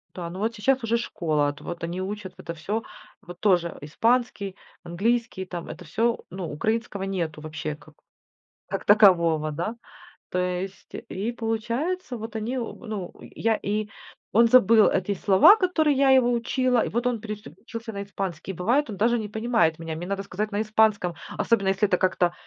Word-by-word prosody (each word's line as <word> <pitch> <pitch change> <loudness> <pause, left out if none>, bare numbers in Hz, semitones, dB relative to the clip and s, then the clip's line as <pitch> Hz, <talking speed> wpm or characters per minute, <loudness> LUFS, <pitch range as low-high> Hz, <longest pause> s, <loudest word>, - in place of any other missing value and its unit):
Да, 175 -2 -5
ну 180 +2 -7
вот 225 +3 -1
сейчас 260 +4 +1
уже 230 +1 +1
школа, 155 -10 0
ат 145 - -8
вот 175 - -6
они 175 +2 -3
учат 195 -1 -5
в - - -36
это 170 - -6
всё. 200 +8 -3 0.4
Вот 175 0 -11
тоже, 180 -4 +3
а, - - -10
испанский, 225 +2 0 0.3
английский, 200 +3 -1
там 175 -2 -6
это 180 - -9
всё, 230 +8 0
ну, 185 -3 -5
украинского 215 +5 -2
нету 170 -6 -3
вообще 155 -1 -5 0.9
как 195 +1 -4
такового, 170 -7 +5
да. 175 +10 -3 0.5
То 180 - -1
есть 180 +1 -4 0.2
и 210 +5 -2
получается, 235 +7 -2
вот 225 0 -7
они 220 +4 -2
об 235 -3 -5
ну, 205 -5 -5
э, - - -10
я 225 0 +1
и 210 +1 -2 0.5
он 230 +2 +6
забыл 230 -2 +6
эти 195 +2 0
слова, 195 - +7
которые 330 -8 +2
я 275 0 +4
его 255 -2 +5
учила, 245 0 +1
и - - -3
вот 240 +2 -1
он 245 -2 0
переключился 220 - -8
на 200 0 -4
испанский. 195 -2 -5
Бывает, 235 - +1
даже 235 +4 +2
не 210 -1 -5
понимает 220 -7 +1
меня, 165 -1 -5
мне 170 +2 -5
надо 195 0 -2
сказать 205 +2 -3
на 205 +1 0
испанском, 215 -5 +2 0.2
особенно 200 -5 +2
если 195 +2 +2
это 180 - +2
как-то, 180 -1 +1
205 Hz, 180 wpm, -25 LUFS, 180-230 Hz, 0.9 s, слова